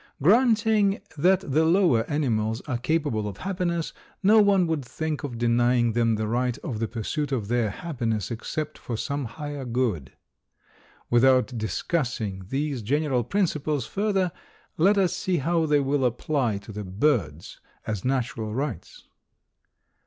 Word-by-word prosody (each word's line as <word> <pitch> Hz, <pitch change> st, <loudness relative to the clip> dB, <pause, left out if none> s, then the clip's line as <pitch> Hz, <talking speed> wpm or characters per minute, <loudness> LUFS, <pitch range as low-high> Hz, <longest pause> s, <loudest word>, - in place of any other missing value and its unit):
Granting 215 Hz, -, +3 dB, 0.2 s
that 180 Hz, +5 st, +3 dB
the 150 Hz, +3 st, +1 dB
lower 165 Hz, -, +3 dB
animals 115 Hz, -6 st, 0 dB
are 125 Hz, -4 st, -3 dB
capable 140 Hz, -7 st, 0 dB
of 100 Hz, -, -6 dB
happiness, 175 Hz, -3 st, -2 dB, 0.3 s
no 215 Hz, +3 st, +6 dB
one 200 Hz, -3 st, +4 dB
would 160 Hz, -4 st, -1 dB
think 150 Hz, +5 st, -4 dB
of 125 Hz, -5 st, -5 dB
denying 120 Hz, 0 st, +2 dB
them 115 Hz, -1 st, +2 dB
the 110 Hz, 0 st, -2 dB
right 125 Hz, +2 st, 0 dB
of 125 Hz, -10 st, -4 dB
the 115 Hz, -, -1 dB
pursuit 125 Hz, +6 st, -3 dB
of 110 Hz, -6 st, -2 dB
their 120 Hz, -2 st, +1 dB
happiness 115 Hz, -, -3 dB
except 150 Hz, +6 st, -4 dB
for 115 Hz, -, -4 dB
some 140 Hz, +2 st, -3 dB
higher 145 Hz, +3 st, -6 dB
good. 115 Hz, -, -1 dB, 1.0 s
Without 130 Hz, +1 st, +4 dB
discussing 110 Hz, -, -2 dB
these 140 Hz, -2 st, -2 dB
general 135 Hz, +2 st, 0 dB
principles 150 Hz, -, -1 dB
further 195 Hz, -3 st, 0 dB, 0.4 s
let 195 Hz, +6 st, +4 dB
us 190 Hz, -3 st, +2 dB
see 185 Hz, -2 st, -1 dB
how 165 Hz, +2 st, +1 dB
they 150 Hz, -1 st, +4 dB
will 140 Hz, 0 st, 0 dB
apply 125 Hz, -2 st, 0 dB
to 100 Hz, +2 st, -10 dB
the 105 Hz, 0 st, -5 dB
birds 95 Hz, -, -1 dB, 0.3 s
as 105 Hz, -4 st, -3 dB
natural 125 Hz, -4 st, -2 dB
rights. 150 Hz, -, -4 dB
135 Hz, 145 wpm, -25 LUFS, 115-160 Hz, 1.0 s, no